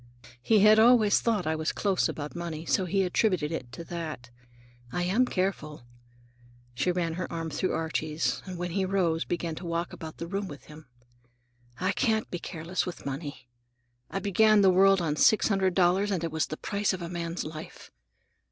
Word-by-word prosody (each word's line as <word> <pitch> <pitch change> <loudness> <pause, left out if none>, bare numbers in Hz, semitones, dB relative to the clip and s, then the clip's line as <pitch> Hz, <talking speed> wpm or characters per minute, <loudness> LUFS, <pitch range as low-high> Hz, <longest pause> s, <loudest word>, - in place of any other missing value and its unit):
He 215 - +4
had 215 +1 +7
always 225 -2 +5
thought 220 -6 0
I 160 0 0
was 155 0 -1
close 195 -3 0
about 150 +1 -6
money, 170 -2 -5
so 190 +3 +1
he 195 +2 +1
attributed 180 -4 +1
it 125 -7 -5
to 170 - -7
that. 155 -8 -6 0.6
I 175 - -1
am 215 +8 +2
careful,"—she 120 - -5
ran 175 -2 -1
her 180 +2 -5
arm 165 -1 -4
through 185 - -1
Archie's 160 -1 -1
and 185 -1 -6
when 175 0 -3
he 195 +2 0
rose 180 -4 0
began 170 -1 -3
to 175 +3 -8
walk 170 +1 -2
about 160 -1 -8
the 170 - -5
room 195 +3 -3
with 145 -5 -10
him. 150 -1 -14 0.9
"I 185 +2 +1
can't 220 -2 0
be 175 - -3
careless 170 +2 -3
with 180 - -7
money. 140 -2 -6 0.6
I - - -4
began 210 +2 +4
the 190 -1 +6
world 195 0 +5
on 150 -2 -1
six 215 - +4
hundred 190 -3 +1
dollars, 185 +2 +3
and 185 -4 -1
it 165 - -2
was 160 0 0
the 155 - -6
price 205 -1 -1
of 185 -2 -5
a - - -4
man's 170 0 -4
life. 155 0 -9
175 Hz, 190 wpm, -28 LUFS, 155-195 Hz, 0.9 s, had